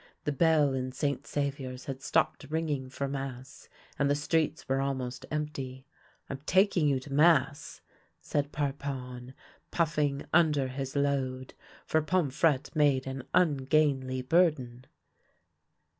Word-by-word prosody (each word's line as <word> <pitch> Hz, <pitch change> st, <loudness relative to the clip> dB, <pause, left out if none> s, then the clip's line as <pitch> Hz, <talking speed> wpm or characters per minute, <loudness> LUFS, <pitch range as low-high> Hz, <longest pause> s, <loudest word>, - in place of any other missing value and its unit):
The 150 Hz, -, 0 dB
bell 150 Hz, -2 st, +3 dB
in 130 Hz, -1 st, -2 dB
St. 140 Hz, 0 st, -2 dB
Saviour's 135 Hz, -3 st, -3 dB
had 135 Hz, -1 st, -6 dB
stopped 145 Hz, -, 0 dB
ringing 150 Hz, -4 st, -2 dB
for 140 Hz, +1 st, -3 dB
mass, 135 Hz, -1 st, -7 dB, 0.3 s
and 140 Hz, -1 st, +2 dB
the 145 Hz, -, +3 dB
streets 155 Hz, +2 st, 0 dB
were 135 Hz, 0 st, +1 dB
almost 130 Hz, -2 st, -3 dB
empty. 140 Hz, -4 st, -4 dB, 0.2 s
" -, -, -36 dB
I'm 135 Hz, -, -5 dB
taking 190 Hz, -5 st, +3 dB
you 135 Hz, -2 st, +2 dB
to 135 Hz, +1 st, -8 dB
mass," 145 Hz, -2 st, +3 dB, 0.4 s
said 145 Hz, 0 st, -2 dB
Parpon, 135 Hz, -3 st, -4 dB, 0.4 s
puf^ng 150 Hz, -4 st, 0 dB
under 150 Hz, -5 st, +3 dB
his 135 Hz, +1 st, -5 dB
load, 135 Hz, -2 st, -1 dB, 0.3 s
for 160 Hz, -, +2 dB
Pomfrette 155 Hz, -3 st, +1 dB
made 145 Hz, -3 st, +3 dB
an 135 Hz, -1 st, -5 dB
ungainly 135 Hz, -4 st, +2 dB
bur 170 Hz, +6 st, +5 dB
den. 125 Hz, -4 st, -10 dB
140 Hz, 130 wpm, -29 LUFS, 130-150 Hz, 0.4 s, bur